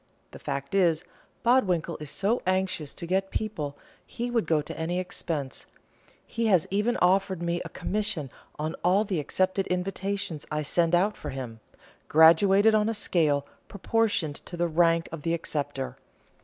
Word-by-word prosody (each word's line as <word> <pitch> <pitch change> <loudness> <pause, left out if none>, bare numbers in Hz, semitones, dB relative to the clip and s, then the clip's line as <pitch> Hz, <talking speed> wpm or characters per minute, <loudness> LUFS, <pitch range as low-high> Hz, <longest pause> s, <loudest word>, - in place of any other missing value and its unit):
The - - -11
fact 140 +4 -4
is, 175 -4 +3 0.4
Bodwinkle 185 -10 +2
is 150 - -5
so 205 - 0
anxious 185 -5 0
to - - -6
get 190 +2 0
people, 155 -12 -3 0.3
he 240 +1 -5
would 230 -8 0
go 160 -1 +3
to 150 - -6
any 165 +2 -2
expense; 165 -6 -3 0.6
he 230 0 -2
has 185 -6 +4
even 210 +5 +1
offered 185 -1 +2
me 170 0 -1
a - - -8
commission 185 - -2 0.3
on 155 +2 -2
all 190 +4 +4
the 195 -6 -2
accepted 185 +6 0
invitations 180 -3 -3
I 150 0 -1
send 170 +3 +2
out 200 +4 +2
for - - -7
him, 125 -4 -6 0.5
graduated 190 +7 +6
on 215 0 +3
a 225 - -1
scale 150 -8 +1 0.2
proportioned 200 -7 0
to 175 - -6
the 175 0 +1
rank 165 0 +2
of 165 -2 -6
the 165 +2 0
acceptor. 140 -5 -3
175 Hz, 160 wpm, -27 LUFS, 155-195 Hz, 0.6 s, graduated